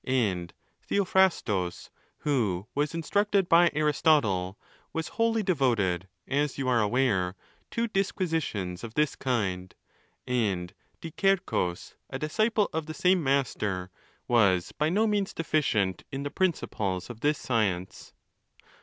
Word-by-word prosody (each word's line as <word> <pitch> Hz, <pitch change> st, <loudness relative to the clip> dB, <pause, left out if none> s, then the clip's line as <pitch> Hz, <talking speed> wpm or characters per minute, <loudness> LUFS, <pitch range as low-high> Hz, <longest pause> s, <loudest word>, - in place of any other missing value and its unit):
And 100 Hz, -10 st, 0 dB, 0.4 s
Theophrastus, 175 Hz, -, +1 dB, 0.3 s
who 105 Hz, -11 st, 0 dB
was 150 Hz, +3 st, -1 dB
instructed 200 Hz, +3 st, +1 dB
by; 170 Hz, 0 st, +6 dB
'Aristotle, 145 Hz, -, +2 dB, 0.4 s
was 160 Hz, 0 st, -3 dB
wholly 225 Hz, -1 st, +1 dB
devoted, 115 Hz, -, +1 dB, 0.2 s
as 145 Hz, +1 st, 0 dB
you 135 Hz, -2 st, -2 dB
are 120 Hz, -3 st, +3 dB
aware, 105 Hz, -5 st, +1 dB, 0.3 s
to 235 Hz, 0 st, -1 dB
disquisi 185 Hz, -5 st, 0 dB
tions 90 Hz, -, -5 dB
of 115 Hz, -1 st, -7 dB
this 150 Hz, -1 st, +1 dB
kind; 95 Hz, -8 st, -2 dB, 0.5 s
and 100 Hz, -8 st, -1 dB, 0.3 s
Diczearchuus, 170 Hz, -, 0 dB, 0.2 s
a -, -, -4 dB
disciple 215 Hz, +7 st, +1 dB
of 160 Hz, -1 st, -2 dB
the 155 Hz, -, -6 dB
same 180 Hz, -2 st, +3 dB
'master, 105 Hz, -9 st, 0 dB, 0.4 s
was 100 Hz, -7 st, +3 dB
by 150 Hz, +1 st, 0 dB
no 205 Hz, +6 st, +2 dB
means 205 Hz, -2 st, 0 dB
deficient 115 Hz, -, 0 dB
in 135 Hz, +1 st, -4 dB
the 145 Hz, -, -4 dB
principles 105 Hz, -, -1 dB
of 115 Hz, -, -11 dB
this 150 Hz, +4 st, +1 dB
science. 95 Hz, -7 st, -2 dB
135 Hz, 125 wpm, -28 LUFS, -, 0.5 s, by